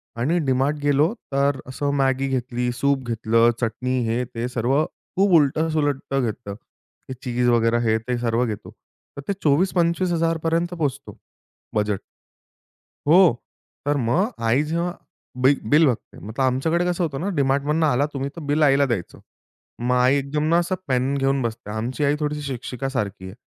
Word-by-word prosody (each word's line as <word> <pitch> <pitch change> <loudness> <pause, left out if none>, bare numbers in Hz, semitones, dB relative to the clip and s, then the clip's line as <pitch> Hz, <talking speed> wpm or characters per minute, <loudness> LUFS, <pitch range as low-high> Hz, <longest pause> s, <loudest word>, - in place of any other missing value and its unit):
आणि 140 +9 0
डीमार्ट 135 +3 +1
गेलो, 145 +6 +3 0.2
तर 140 -1 +2
असं 140 +2 -2
मॅगी 135 0 +1
घेतली, 125 -2 -1
सूप 135 +2 0
घेतलं, 115 0 +3
चटणी 125 +3 -1
हे 115 +2 0
ते 115 +2 -2
सर्व 125 +5 +1
खूप 195 +1 -2
उलट-सुलट 145 -1 0
घेतलं. 110 -2 -4 0.6
हे - - -3
चीज 125 -1 0
वगैरे 115 0 +3
हे 110 - +3
ते 125 -1 0
सर्व 120 +1 +1
घेतो. 110 -3 -6 0.5
तर 140 - -4
ते 200 - +1
24000-25000 170 +1 +1
पोहचतो, 140 -5 -3 0.6
बजेट. 105 -2 0 1.1
हो, 160 +4 +7 0.7
तर 145 0 +1
मग 185 - +2 0.2
आई 130 +6 +3
जेव्हा 170 +3 -2 0.4
बिल 135 +2 +4
बिल 155 +2 +6
बघते 120 - -3
मतलब 110 +6 -3
आमच्याकडे 160 +7 +1
कसं 180 0 0
होतं 140 -5 -2
ना, 190 - -2
डी-मार्टमधनं 140 +3 +1
आला 135 +1 +2
तुम्ही 135 0 -3
तर 170 - -7
बिल 150 +2 +2
आईला 140 -1 +4
द्यायचं. 115 -9 -3 0.6
मग 125 +1 +1
आई 125 +2 +4
एकदम 140 +2 -2
ना 170 - +4
असं 175 +2 -1
पेन 130 +1 +1
घेऊन 135 0 +1
बसते, 115 -3 -4
आमची 120 +7 -3
आई 145 +1 +2
थोडीशी 150 0 -2
शिक्षिका 135 -1 -4
सारखी 100 -8 -3
आहे. 95 - -8
135 Hz, 160 wpm, -23 LUFS, 120-150 Hz, 1.1 s, हो